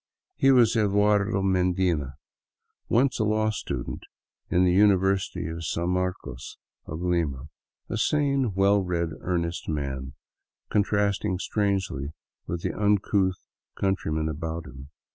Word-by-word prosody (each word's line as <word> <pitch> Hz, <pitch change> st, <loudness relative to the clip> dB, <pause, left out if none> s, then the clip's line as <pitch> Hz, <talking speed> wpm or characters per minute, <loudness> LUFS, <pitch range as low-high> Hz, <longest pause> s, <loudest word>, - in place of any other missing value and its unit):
He 135 Hz, -, +3 dB
was 120 Hz, -4 st, +5 dB
Eduardo 105 Hz, -1 st, +2 dB
Medina, 90 Hz, -6 st, +1 dB, 0.7 s
once 130 Hz, +2 st, +2 dB
a -, -, +3 dB
law 110 Hz, 0 st, +1 dB
student 105 Hz, -, -4 dB, 0.5 s
in 90 Hz, -, +3 dB
the 90 Hz, -1 st, +3 dB
Uni 100 Hz, +1 st, +6 dB
versity 95 Hz, -3 st, -1 dB
of 85 Hz, -, -6 dB
San 85 Hz, +2 st, -1 dB
Marcos 90 Hz, -9 st, -3 dB, 0.3 s
of 80 Hz, +2 st, -5 dB
Lima, 80 Hz, -6 st, -1 dB, 0.4 s
a -, -, -3 dB
sane, 140 Hz, -7 st, +1 dB
well 100 Hz, +1 st, +4 dB
read, 85 Hz, -2 st, -1 dB
earnest 85 Hz, -2 st, -2 dB
man, 65 Hz, -3 st, -3 dB, 0.6 s
con 105 Hz, -, +4 dB
trasting 100 Hz, -1 st, 0 dB
strangely 95 Hz, -9 st, -1 dB, 0.3 s
with 85 Hz, 0 st, -4 dB
the -, -, -1 dB
uncouth 100 Hz, -2 st, +1 dB, 0.3 s
countrymen 80 Hz, -5 st, -1 dB
about 80 Hz, +1 st, -4 dB
him. 65 Hz, 0 st, -11 dB
95 Hz, 125 wpm, -26 LUFS, 80-105 Hz, 0.7 s, Uni